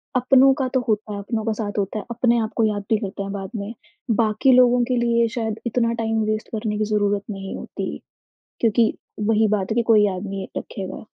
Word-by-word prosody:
अपनों 265 Hz, +2 st, +5 dB
का 265 Hz, -, +1 dB
तो 260 Hz, -, +3 dB
होता 215 Hz, -1 st, -1 dB
है, 200 Hz, -, -4 dB
अपनों 220 Hz, +2 st, -3 dB
का 225 Hz, -, +1 dB
साथ 210 Hz, -1 st, -4 dB
होता 200 Hz, +2 st, -2 dB
है, -, -, -8 dB
अपने 240 Hz, 0 st, +2 dB
आप 220 Hz, 0 st, -2 dB
को 230 Hz, -, +2 dB
याद 205 Hz, -2 st, -1 dB
भी 220 Hz, -, +3 dB
करते 200 Hz, -1 st, -5 dB
हैं 195 Hz, -, -5 dB
बाद 195 Hz, -1 st, -5 dB
में, 210 Hz, +2 st, -4 dB, 0.4 s
बाकी 220 Hz, +4 st, +3 dB
लोगों 245 Hz, -1 st, +5 dB
के -, -, +3 dB
लिए 235 Hz, -1 st, +2 dB
शायद 220 Hz, -1 st, -2 dB
इतना 230 Hz, 0 st, +1 dB
टाइम 225 Hz, 0 st, 0 dB
वेस्ट 215 Hz, 0 st, -3 dB
करने 215 Hz, -1 st, -2 dB
की 215 Hz, -, 0 dB
ज़रूरत 205 Hz, -1 st, +1 dB
नहीं 195 Hz, -1 st, -6 dB
होती -, -, -5 dB, 0.6 s
क्योंकि 230 Hz, 0 st, +3 dB, 0.3 s
वही 220 Hz, -1 st, +3 dB
बात 205 Hz, -1 st, -1 dB
है -, -, 0 dB
कि 235 Hz, -, +3 dB
कोई 215 Hz, -2 st, +5 dB
याद 185 Hz, -1 st, -2 dB
नहीं 195 Hz, -1 st, -5 dB
रखेगा। 190 Hz, +1 st, -6 dB
215 Hz, 220 wpm, -22 LUFS, 205-235 Hz, 0.6 s, अपनों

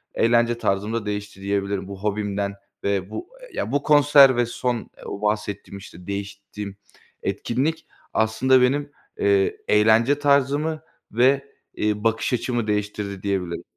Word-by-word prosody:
eğlence 120 Hz, 0 st, +3 dB
tarzım 105 Hz, -1 st, -1 dB
da 115 Hz, -2 st, -2 dB
değişti 105 Hz, -1 st, -5 dB
diyebilirim 100 Hz, -1 st, -2 dB
bu 100 Hz, 0 st, -9 dB
hobimden 100 Hz, -1 st, -1 dB, 0.3 s
ve 100 Hz, -1 st, -1 dB
bu, 355 Hz, -, -7 dB
eee, -, -, -12 dB
ya, -, -, -3 dB
bu 145 Hz, +1 st, 0 dB
konser 145 Hz, -3 st, +7 dB
ve 120 Hz, -, +3 dB
son 120 Hz, 0 st, -3 dB, 0.2 s
o 100 Hz, -, -6 dB
bahsettiğim, 105 Hz, -1 st, -2 dB
işte, 90 Hz, -2 st, -13 dB
değiştiğim 100 Hz, 0 st, -6 dB, 0.5 s
etkinlik 155 Hz, +7 st, -1 dB, 0.3 s
aslında 125 Hz, +4 st, +3 dB
benim, 145 Hz, +3 st, +1 dB, 0.3 s
eee, 100 Hz, -1 st, +2 dB
eğlence 110 Hz, +6 st, +4 dB
tarzımı 145 Hz, +2 st, +2 dB, 0.3 s
ve, 135 Hz, +4 st, +3 dB, 0.3 s
eee, 105 Hz, 0 st, -1 dB
bakış 115 Hz, +3 st, +1 dB
açımı 120 Hz, -2 st, -1 dB
değiştirdi 105 Hz, -2 st, -3 dB
diyebilirim. 95 Hz, -4 st, -2 dB
105 Hz, 135 wpm, -23 LUFS, 100-130 Hz, 0.5 s, konser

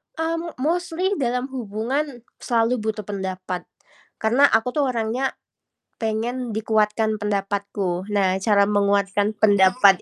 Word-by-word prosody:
Mmm, 330 Hz, +1 st, -2 dB
mostly 355 Hz, +5 st, 0 dB
dalam 250 Hz, +1 st, -1 dB
hubungan 245 Hz, +3 st, -3 dB, 0.2 s
selalu 235 Hz, +1 st, +1 dB
butuh 215 Hz, 0 st, -3 dB
pendapat, 185 Hz, -2 st, -4 dB, 0.6 s
karena 240 Hz, +6 st, +4 dB
aku 225 Hz, 0 st, +2 dB
tuh 285 Hz, 0 st, +1 dB
orangnya 245 Hz, +2 st, -1 dB, 0.7 s
pengen 235 Hz, +3 st, -2 dB
dikuatkan 215 Hz, 0 st, +1 dB
pendapatku. 200 Hz, -2 st, -2 dB
Nah, 190 Hz, -2 st, +1 dB
cara 200 Hz, 0 st, +4 dB
menguatkan 205 Hz, +1 st, +1 dB
pendapat 195 Hz, -1 st, +5 dB
220 Hz, 110 wpm, -23 LUFS, 200-250 Hz, 0.7 s, pendapat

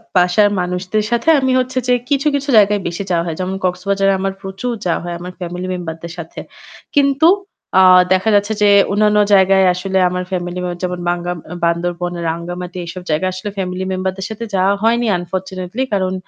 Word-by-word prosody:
বাসার 180 Hz, +3 st, +4 dB
মানুষদের 180 Hz, +4 st, -1 dB
সাথে 235 Hz, +7 st, +1 dB
আমি 260 Hz, -1 st, +1 dB
হচ্ছে 255 Hz, 0 st, -3 dB
যে 250 Hz, -, +4 dB, 0.2 s
কিছু, 280 Hz, +1 st, +1 dB
কিছু, 280 Hz, +1 st, -3 dB
জায়গায় 205 Hz, -1 st, +4 dB
বেশি 175 Hz, +3 st, -4 dB
যাওয়া 170 Hz, -1 st, +1 dB
হয়। 165 Hz, -2 st, -3 dB
যেমন 185 Hz, +1 st, -2 dB
কক্সবাজারে 195 Hz, +2 st, +1 dB
আমার 195 Hz, 0 st, -1 dB
প্রচুর 195 Hz, +5 st, -4 dB
যাওয়া 175 Hz, -, 0 dB
হয় 175 Hz, 0 st, -4 dB
আমার 180 Hz, +1 st, -8 dB
ফ্যামিলি 180 Hz, +1 st, -5 dB
মেম্বার 170 Hz, -3 st, -5 dB
দের 170 Hz, -1 st, -7 dB
সাথে। 165 Hz, -1 st, -8 dB, 0.6 s
কিন্তু 280 Hz, +2 st, +4 dB, 0.5 s
আ -, -, +7 dB, 0.3 s
দেখা 190 Hz, +4 st, +1 dB
যাচ্ছে 205 Hz, +2 st, +2 dB
যে 205 Hz, -, +5 dB, 0.2 s
অন্যান্য 210 Hz, +1 st, +3 dB, 0.2 s
জায়গায় 190 Hz, 0 st, +5 dB
আসলে 190 Hz, +1 st, -2 dB
আমার 180 Hz, 0 st, -3 dB
ফ্যামিলি 180 Hz, -1 st, -3 dB
মেম্বার 175 Hz, -1 st, -5 dB
যেমন 180 Hz, 0 st, -2 dB
বাংগা 175 Hz, 0 st, -2 dB
আম 170 Hz, -, -9 dB, 0.3 s
বান্দরবন, 175 Hz, +1 st, -1 dB, 0.2 s
রাঙ্গামাটি 175 Hz, +2 st, -5 dB
এসব 180 Hz, +2 st, -7 dB
জায়গায় 175 Hz, +5 st, 0 dB
আসলে 185 Hz, +3 st, -5 dB
ফ্যামিলি 185 Hz, 0 st, -3 dB
মেম্বার 185 Hz, 0 st, -1 dB
দের 190 Hz, -, -5 dB
সাথে 220 Hz, +1 st, -6 dB
যাওয়া 190 Hz, +1 st, +3 dB
হয়নি 235 Hz, +1 st, +2 dB
আনফরচুনেটলি 185 Hz, +5 st, -4 dB
কারণ 185 Hz, -1 st, 0 dB
185 Hz, 185 wpm, -17 LUFS, 175-205 Hz, 0.6 s, আ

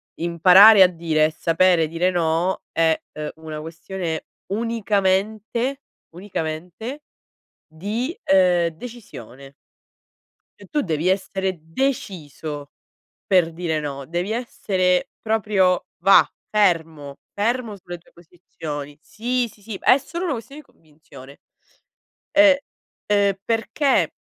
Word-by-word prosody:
imparare 185 Hz, +5 st, +7 dB
a -, -, +7 dB
dire 165 Hz, -3 st, 0 dB
e 155 Hz, -, 0 dB
sapere 165 Hz, +1 st, +2 dB
dire 170 Hz, +3 st, 0 dB
no, 175 Hz, +1 st, 0 dB
è, 160 Hz, -1 st, +2 dB
uhm, 150 Hz, 0 st, -5 dB
una 155 Hz, -1 st, -8 dB
questione 165 Hz, +1 st, -5 dB, 0.3 s
unicamente, 215 Hz, +3 st, -1 dB, 0.3 s
unicamente 180 Hz, -, -6 dB, 0.6 s
di, 215 Hz, -, -4 dB, 0.2 s
uhm, 180 Hz, -2 st, +4 dB
decisione. 155 Hz, -, -11 dB, 1.1 s
E -, -, -13 dB
tu 300 Hz, -, +1 dB
devi 165 Hz, -, -2 dB
essere 190 Hz, -1 st, -1 dB
deciso 160 Hz, -, -4 dB, 0.6 s
per 180 Hz, -4 st, +3 dB
dire 165 Hz, -2 st, -2 dB
no, 140 Hz, -2 st, -6 dB
devi 175 Hz, +6 st, -3 dB
essere 195 Hz, -3 st, 0 dB
proprio, 205 Hz, -4 st, +1 dB
và, 195 Hz, -, +7 dB, 0.2 s
fermo, 160 Hz, -8 st, 0 dB, 0.2 s
fermo 230 Hz, +1 st, -1 dB
sulle 175 Hz, -2 st, -9 dB
tue 170 Hz, -, -26 dB
posizioni. 155 Hz, -4 st, -9 dB
Sì, 245 Hz, +2 st, -2 dB
sì, 205 Hz, -, -22 dB
sì, 215 Hz, 0 st, -6 dB
è 260 Hz, -, +6 dB
solo 340 Hz, +6 st, -6 dB
una 310 Hz, -, -1 dB
questione 275 Hz, +5 st, -9 dB
di -, -, -32 dB
convinzione. 145 Hz, -3 st, -16 dB, 0.9 s
Ehm, 300 Hz, -2 st, +6 dB, 0.6 s
uhm, 200 Hz, -1 st, +3 dB
perché 230 Hz, +5 st, +1 dB
185 Hz, 110 wpm, -22 LUFS, 160-220 Hz, 1.1 s, imparare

